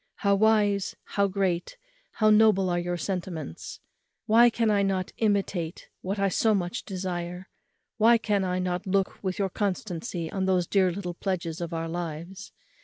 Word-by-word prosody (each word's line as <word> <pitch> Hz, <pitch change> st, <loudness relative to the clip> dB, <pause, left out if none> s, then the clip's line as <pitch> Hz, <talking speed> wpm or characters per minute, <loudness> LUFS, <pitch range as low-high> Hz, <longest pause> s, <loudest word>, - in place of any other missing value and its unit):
how 200 Hz, -1 st, +1 dB
wise, 205 Hz, -1 st, +2 dB
how 200 Hz, 0 st, +2 dB
great, 190 Hz, -, -1 dB, 0.4 s
how 215 Hz, -1 st, +3 dB
noble 210 Hz, -4 st, +4 dB
are 175 Hz, -, +1 dB
your 175 Hz, 0 st, -2 dB
sentiments! 175 Hz, -, -5 dB, 0.5 s
why 235 Hz, +3 st, +6 dB
can 225 Hz, -1 st, +1 dB
I 205 Hz, -1 st, +3 dB
not 190 Hz, -2 st, -1 dB
imitate 195 Hz, -6 st, -1 dB
what 195 Hz, +3 st, -3 dB
I 200 Hz, 0 st, +2 dB
so 215 Hz, +3 st, +2 dB
much 180 Hz, +4 st, -2 dB
admire? 180 Hz, -1 st, -4 dB, 0.5 s
why 230 Hz, +2 st, +6 dB
can 205 Hz, -3 st, 0 dB
I 180 Hz, -1 st, -1 dB
not 180 Hz, +1 st, -2 dB
look 195 Hz, +1 st, 0 dB
with 185 Hz, -1 st, -2 dB
your 195 Hz, -1 st, 0 dB
constancy 180 Hz, -4 st, -3 dB
on 190 Hz, -1 st, -1 dB
those 185 Hz, -2 st, +2 dB
dear 190 Hz, 0 st, +2 dB
little 180 Hz, -1 st, -5 dB
pledges 175 Hz, -2 st, -3 dB
of 170 Hz, 0 st, -4 dB
our 165 Hz, 0 st, -3 dB
loves? 175 Hz, +3 st, -6 dB
190 Hz, 165 wpm, -27 LUFS, 175-205 Hz, 0.5 s, why